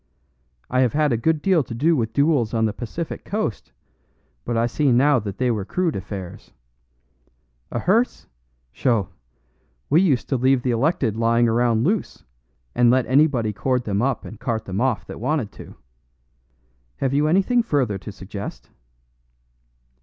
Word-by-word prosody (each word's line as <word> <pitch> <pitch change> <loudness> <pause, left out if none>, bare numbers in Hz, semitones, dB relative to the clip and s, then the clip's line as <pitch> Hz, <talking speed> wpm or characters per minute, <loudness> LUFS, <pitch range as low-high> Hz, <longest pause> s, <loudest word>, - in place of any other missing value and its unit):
I 125 - 0
have 125 -3 +2
had 150 -3 +2
a - - +3
good 150 +6 0
deal 185 -4 +3
to 115 - -7
do 160 +7 +2
with 115 -5 -1
duels 140 -6 +1
on 110 0 +2
the 110 - -1
Pacific 140 +9 -6
coast, 210 - -3 0.7
but 120 -1 -1
I 115 - +2
see 135 +3 +1
now 130 +3 +4
that 100 -3 -6
they 125 -1 +1
were 105 -4 -2
crude 175 - -1
affairs. 95 -2 -7 1.2
A - - -4
hearse 210 - +1 0.5
sho! 110 - 0 0.8
we 160 +4 +6
used 150 -10 +1
to 135 - +1
leave 130 0 +2
the 125 - +1
elected 120 - +1
lying 115 +1 +3
around 115 0 +2
loose, 200 +5 -1 0.5
and 120 0 +4
let 130 +1 +3
anybody 130 -5 +2
cord 125 +4 0
them 100 -2 -1
up 130 -4 -1
and 100 +4 -10
cart 115 -3 -2
them 95 +3 -3
off 130 -4 0
that - - -9
wanted 125 -2 -1
to. - - -12 1.2
Have 135 -1 -1
you 145 +2 +2
anything 195 +9 +3
further 130 - 0
to 105 - -8
suggest?" 100 +1 -8
125 Hz, 160 wpm, -22 LUFS, 110-150 Hz, 1.2 s, we